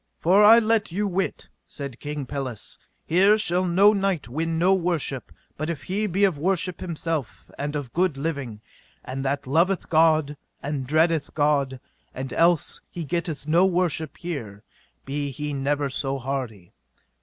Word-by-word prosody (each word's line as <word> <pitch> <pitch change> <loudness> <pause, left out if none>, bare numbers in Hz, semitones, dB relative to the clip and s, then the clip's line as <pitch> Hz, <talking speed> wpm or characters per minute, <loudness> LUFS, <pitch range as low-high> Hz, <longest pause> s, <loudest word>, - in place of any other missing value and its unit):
For 190 +5 +4
I 220 +2 +9
let 220 -3 +2
you 205 +4 -1
wit, 190 0 -2 0.2
said 140 -4 -7
King 145 -1 -5
Pelles, 130 -4 -6 0.3
here 195 +5 +4
shall 185 -3 +2
no 195 +4 +5
knight 195 -6 -1
win 160 +6 -2
no 180 +3 +4
worship 170 -8 -1 0.3
but 155 +2 -3
if 150 -4 -4
he 205 +7 -1
be 195 +2 0
of 185 -7 +2
worship 180 +1 0
himself 165 -5 -4
and 145 +1 -4
of 140 -5 -5
good 175 -4 +1
living, 140 -8 -4 0.4
and 135 +1 -4
that 140 +1 -1
loveth 170 +8 +1
God 155 -2 +3 0.3
and 140 -3 -3
dreadeth 160 +1 +1
God, 140 -3 +1 0.4
and 130 0 -5
else 170 0 +2
he 170 - -6
getteth 160 -2 -3
no 170 +4 +4
worship 175 -4 -1
here, 115 - -6 0.4
be 140 +1 -3
he 145 +2 -4
never 140 +1 0
so 135 0 -2
hardy. 125 -8 -5
155 Hz, 155 wpm, -24 LUFS, 140-180 Hz, 0.4 s, I